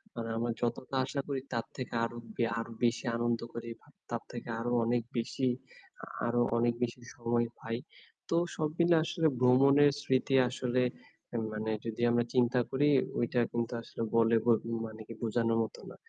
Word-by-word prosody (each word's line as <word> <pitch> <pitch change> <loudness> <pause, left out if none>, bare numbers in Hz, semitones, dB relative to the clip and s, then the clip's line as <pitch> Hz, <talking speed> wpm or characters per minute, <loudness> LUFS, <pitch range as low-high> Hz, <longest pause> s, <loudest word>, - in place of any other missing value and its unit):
মানে 115 -1 -4
আমরা 120 0 0
যতটা 125 +2 -2
আশা 140 +1 -2
করি 135 -2 -2
তার 115 - -1
থেকে 130 -3 -5
আরো 120 +1 -3 0.2
বে 120 - +2
আরো 115 0 -5
বেশি 120 +2 +2
আনন্দ 120 0 +1
করি, 115 0 -6
ব - - -39 0.3
তার - - -3
থেকে - - -7
আরো 120 +1 -2
অনেক 120 0 +1
বেশি, 130 +3 0 0.6
আ - - -4 0.2
আরো 120 0 +2 0.2
অনেক 120 0 +3
বেশি 120 +1 -3
সময় 120 0 +1
পাই। 115 +1 -3 0.5
তো 165 - +2 0.2
সব 155 -2 0
মিলে 170 0 +5
আসলে 165 -1 +1
ভ্রমণের 140 +3 +6
স্মৃতি 135 0 +1
আসলে 125 0 0 0.7
মানে 110 +1 -2
যদি 115 +1 -4
আমরা 120 0 +3
চিন্তা 125 0 +3
করি 145 +2 +2 0.3
ঐটা 120 +1 +1
কিন্তু 120 +1 -1
আসলে 115 - -8
বলে 115 0 +5
বো 120 - +5 0.3
মানে 110 0 -8
কি 115 - -7
বোঝানোর 115 0 +1
মত 110 - -6
না। - - -11
120 Hz, 175 wpm, -31 LUFS, 115-130 Hz, 0.7 s, ভ্রমণের